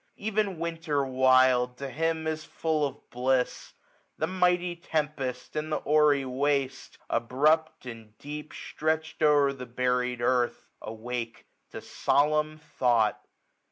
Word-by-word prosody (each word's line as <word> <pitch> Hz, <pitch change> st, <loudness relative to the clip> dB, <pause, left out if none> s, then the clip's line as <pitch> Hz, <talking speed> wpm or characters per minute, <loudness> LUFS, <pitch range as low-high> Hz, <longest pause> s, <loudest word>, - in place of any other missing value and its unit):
Even 205 Hz, -3 st, -1 dB
Winter 165 Hz, -4 st, -2 dB
wild 130 Hz, -1 st, +3 dB
to 140 Hz, -, -5 dB
him 160 Hz, +3 st, -1 dB
is 155 Hz, 0 st, -2 dB
full 155 Hz, -2 st, -1 dB
of -, -, -13 dB
bliss. 125 Hz, +1 st, -1 dB
1JI5 -, -, -39 dB
The 160 Hz, -, -1 dB
mighty 180 Hz, -1 st, +1 dB
tempest, 150 Hz, -7 st, -3 dB
and 155 Hz, +1 st, -3 dB
the 150 Hz, -, -1 dB
hoary 150 Hz, -2 st, +3 dB
waste^ 135 Hz, +1 st, -1 dB
Abrupt, 150 Hz, +6 st, +1 dB
and 115 Hz, -3 st, -10 dB
deep, 150 Hz, +1 st, -8 dB
stretch'd 160 Hz, +1 st, -3 dB
o'er 145 Hz, -2 st, +4 dB
the 125 Hz, -2 st, -8 dB
buried 125 Hz, 0 st, 0 dB
earth. 120 Hz, 0 st, 0 dB
Awake 115 Hz, +1 st, -6 dB, 0.2 s
to -, -, -8 dB
solemn 150 Hz, +1 st, +1 dB
thought. 120 Hz, -7 st, +1 dB
145 Hz, 125 wpm, -28 LUFS, 125-155 Hz, 0.2 s, o'er